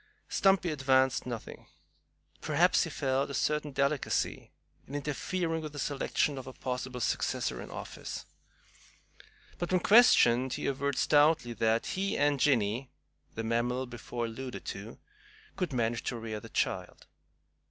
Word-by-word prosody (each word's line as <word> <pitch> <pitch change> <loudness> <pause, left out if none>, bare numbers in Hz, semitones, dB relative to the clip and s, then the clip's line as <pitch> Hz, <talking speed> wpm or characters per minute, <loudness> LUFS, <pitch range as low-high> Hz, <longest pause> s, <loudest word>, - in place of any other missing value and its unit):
Stumpy 195 -3 +3
advanced 130 -2 +2
nothing. 120 -3 -7 0.7
Perhaps - - +3
he - - -5
felt 135 0 0
a 140 - -4
certain 150 +2 0
delicacy 140 +1 -1 0.4
in 140 - -7
interfering 160 +3 -2
with 155 -1 -7
the - - -8
selection 140 0 0
of 130 - -9
a 130 - -7
possible 125 0 -4
successor - - -1
in - - -9
office. - - -7 1.3
But 175 - -2
when 185 - +4
questioned, 130 - +6
he - - -3
averred 140 0 -1
stoutly 145 -5 +3
that 110 +1 +1
he 195 +1 -1
and 145 -1 +2
"Jinny" 125 -2 +2 0.5
the 115 - -3
mammal 120 +3 0
before 120 0 -5
alluded 125 +3 -6
to 105 +4 -9 0.6
could 180 -4 -2
manage 120 -2 0
to 120 - -2
rear 110 -2 -5
the - - -12
child. - - -2
130 Hz, 140 wpm, -30 LUFS, 120-150 Hz, 1.3 s, questioned